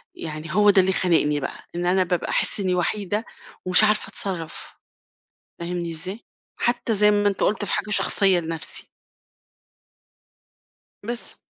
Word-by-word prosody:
يعني 155 0 -7
هو 210 +2 +5
ده 200 -1 +6
اللي 190 +1 +1
خانقني 160 -6 +2
بقى، - - -5 0.2
إن 175 0 -2
أنا 185 +1 +3
بابقى 175 -1 -2
أحس - - +2
إنّي 185 -2 0
وحيدة 205 +4 -1 0.4
ومش 185 +3 +5
عارفة 215 0 +2
أتصرّف، 175 -5 -4 0.8
فاهمني 170 0 -4
إزاي؟ 180 +6 -6 0.4
حتّى 240 -1 0
زي 210 0 +5
ما 205 0 +2
أنت 200 - -1
قُلت 210 0 +1
في - - -5
حاجة - - -2
شخصيّة 195 -3 +4
لنَفْسي. 165 -1 -5 2.2
بس 235 +2 -4
185 Hz, 140 wpm, -23 LUFS, 170-210 Hz, 2.2 s, ده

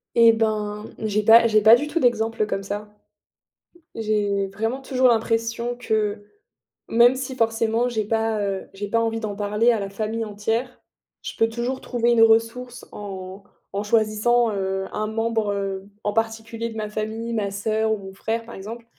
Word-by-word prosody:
Et 230 -1 +7
ben, 215 -1 -1
j'ai 215 -1 0
pas 230 +2 +7
j'ai 215 -1 +3
pas 220 +2 +9
du 290 +5 -2
tout 335 - -1
d'exemple 225 -4 +1
comme 195 - -3
ça. 205 +1 -6 1.0
J'ai 205 -3 0
vraiment 225 +7 -3
toujours 260 -1 +2
l'impression 230 +1 0
que 215 -3 -1 0.6
même 240 +2 +5
si 260 0 -5
forcément 225 0 +1
j'ai 220 -3 -2
pas, 220 0 0
heu, 195 -1 -3
j'ai 200 +1 -5
pas 230 - +2
envie 225 0 -1
d'en 210 -3 -4
parler 210 +3 +2
à 225 - 0
la 200 -1 -4
famille 220 +3 -3
entière, 225 +4 -3 0.4
je - - -6
peux 225 - +4
toujours 245 +3 -3
trouver 240 -1 0
une 235 -1 +4
ressource 230 +2 +1
en 190 -1 -8 0.3
en 200 +1 -2
choisissant, 220 +2 +2
heu, 190 -1 -2
un 215 0 -2
membre, 225 -1 -1
heu, 195 0 -4 0.2
en 205 - 0
particulier 225 +1 -2
de 225 - -9
ma 215 -1 -3
famille, 220 +2 -4
ma 205 -3 -1
soeur 220 +2 0
ou 195 -2 -6
frère 225 +4 -3
par 235 - -10
exemple, 225 +4 -8
220 Hz, 175 wpm, -23 LUFS, 210-230 Hz, 1.0 s, pas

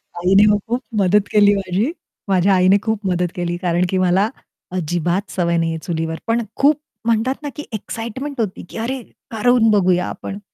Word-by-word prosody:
आईने 190 +4 +4
मग 205 - +2
खूप 240 +3 -1 0.2
मदत 200 +2 +3
केली 205 -1 +5
माझी. 195 - -1 0.4
माझ्या 190 +1 +3
आईने 185 +2 +5
खूप 220 -3 -2
मदत 180 -1 +1
केली. 175 -1 -2
कारण 175 0 +1
की 190 - 0
मला 185 +3 +2 0.5
अजिबात 175 +3 -1
सवय 170 -2 0
नाही 165 0 0
आहे 160 - -4
चुलीवर, 160 -1 -2
पण 230 +1 +2
खूप 290 +1 +3 0.3
म्हणतात 230 +3 +1
ना, 290 - -3
की 295 - -6
एक्साइटमेंट 235 +6 -5
होती, 205 -4 -3
की - - -9
अरे! 250 +4 -3 0.3
करून 225 +1 +3
बघूया 180 -3 +3
आपण. 200 - -7
195 Hz, 175 wpm, -19 LUFS, 180-225 Hz, 0.5 s, केली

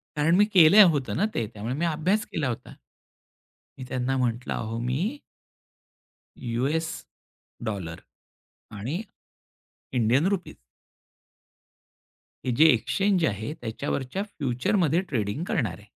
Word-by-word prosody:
कारण 155 +3 +3
मी - - +6
केलं 185 +3 +9
होतं 140 -3 -2
ना 200 - +2
ते. 115 - 0
त्यामुळे 110 +4 -4
मी 165 +4 -1
अभ्यास 170 +6 +1
केला 155 -4 -2
होता. 120 +1 -6 1.0
मी 130 - -7
त्यांना 130 +1 -1
म्हटलं, 120 -1 -1
अहो 115 0 -4
मी 130 +5 0 1.4
युएस 135 +7 -1 0.8
डॉलर 95 -7 -4 0.7
आणि 125 - -4 0.9
इंडियन 125 +6 +3
रूपीज 195 -3 -2 1.9
हे 130 - +1
जे 155 - +7
एक्सचेंज 180 - +1
आहे, 110 +3 -2
त्याच्यावरच्या 130 - -3
फ्युचरमध्ये 165 - 0
ट्रेडिंग 110 +4 -2
करणार 130 - -1
आहे. 105 - -17
135 Hz, 115 wpm, -26 LUFS, 115-165 Hz, 1.9 s, केलं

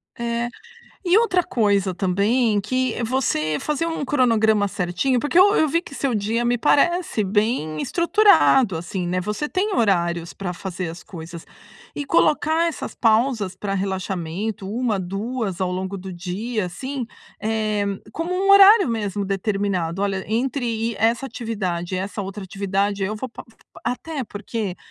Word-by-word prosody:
É. 235 0 -2 0.6
E 360 +1 +4
outra 365 -6 +2
coisa 200 - +1
também, 205 +4 +2
que 255 +3 -1
você 220 - 0
fazer 300 - -1
um 325 -3 -2
cronograma 220 -6 +3
certinho, 195 +8 0
porque 295 +7 +1
eu 405 +3 +6
eu 315 - +4
vi 335 +4 +1
que 280 - -11
seu 275 -3 -1
dia 220 +3 0
me 240 0 +2
parece 305 - +2
bem 200 -6 0
estruturado, 340 - +4
assim, 175 +2 -4
né, 180 +1 0
você 210 +10 -3
tem 395 +5 -1
horários 175 -6 +1
pra 185 -3 -4
fazer 180 -1 -5
as 170 +2 -8
coisas. 170 -1 -9 0.5
E 290 - -3
colocar 315 +2 +2
essas 330 - -6
pausas 220 -4 +1
pra 195 0 -3
relaxamento, 190 +1 -3
1, 230 -2 0
2 195 +1 -3
ao 185 -1 0
longo 190 +2 -3
do 190 0 -7
dia, 195 +5 -3
assim, 260 +7 -5 0.4
eh, 215 -1 0 0.3
como 330 +2 -3
um 390 +2 +2
horário 395 - +8
mesmo, 205 -3 -2
determinado: 195 -3 -1
"Olha, 195 -1 -1
entre 250 +4 -1
i 230 0 -1
essa 230 +4 +2
atividade 195 -8 -3
e - - -1
essa 200 +2 -4
outra 195 +1 -6
atividade, 200 +1 -1
eu 205 +3 -1
vou 255 +4 -5
pa - - -10
pa" 225 - -20
até 285 +3 -3
porque, 210 -2 -5
215 Hz, 155 wpm, -22 LUFS, 190-255 Hz, 0.6 s, horário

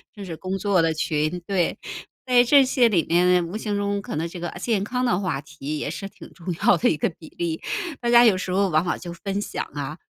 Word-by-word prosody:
就 205 - -8
是 170 -3 -6
工 190 +1 -3
作 195 -3 +2
的 165 -1 +2
群， 155 +2 -1
对。 185 -4 0 0.5
在 245 -1 +6
这 275 +2 +6
些 250 -2 +3
里 175 -7 +2
面 180 0 +3
无 180 - -7
形 210 -2 -2
中 200 0 -1
可 - - -6
能 160 +2 -1
这 175 - -9
个 175 0 -3
健 210 -2 0
康 250 +4 -1
的 180 -7 +2
话 180 -8 -2
题 150 0 -6
也 - - -3
是 195 -1 -6
挺 - - -14
重 180 0 -6
要 240 - +6
的 245 - +2
一 150 - 0
个 - - +1
比 160 - -12
例， 165 -2 -2 0.4
大 240 - -1
家 240 0 +7
有 215 - +5
时 185 0 -4
候 195 +2 +2
往 155 -1 +2
往 175 - -1
就 175 -1 -8
分 195 +3 -4
享 205 - -3
啊， 145 +1 -4
185 Hz, 265 characters per minute, -24 LUFS, 165-205 Hz, 0.5 s, 家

